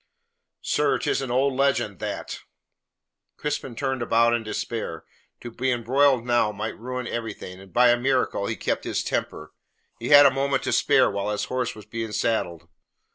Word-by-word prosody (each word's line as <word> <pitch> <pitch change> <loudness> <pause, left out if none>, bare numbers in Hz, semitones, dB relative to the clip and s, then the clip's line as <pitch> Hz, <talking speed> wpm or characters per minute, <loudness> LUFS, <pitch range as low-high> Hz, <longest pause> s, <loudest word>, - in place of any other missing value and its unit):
"Sir, - - +1
'tis - - -1
an 135 - -4
old 130 +3 +2
legend, 140 +1 0
that!" - - -5 1.0
Crispin 145 -4 -4
turned 130 0 -2
about 115 0 +3
in 120 - +1
despair. 110 -5 -5 0.4
To 120 - -7
be 130 +3 -2
embroiled 125 +1 +2
now 120 -3 +2
might 105 0 -5
ruin 125 +2 -5
everything, 110 -6 -6
and 95 -1 -15
by 125 0 +5
a 120 - +4
miracle 125 -5 0
he - - -2
kept - - -2
his - - -2
temper. 75 - -4 0.5
He 120 - -4
had 145 -1 +9
a 140 - +7
moment 135 0 0
to - - -1
spare - - +4
while 100 +1 -2
his 105 -1 -2
horse 125 -2 -2
was 105 -2 -12
being 115 0 -5
saddled. 85 -9 -1
120 Hz, 175 wpm, -24 LUFS, 110-130 Hz, 1.0 s, had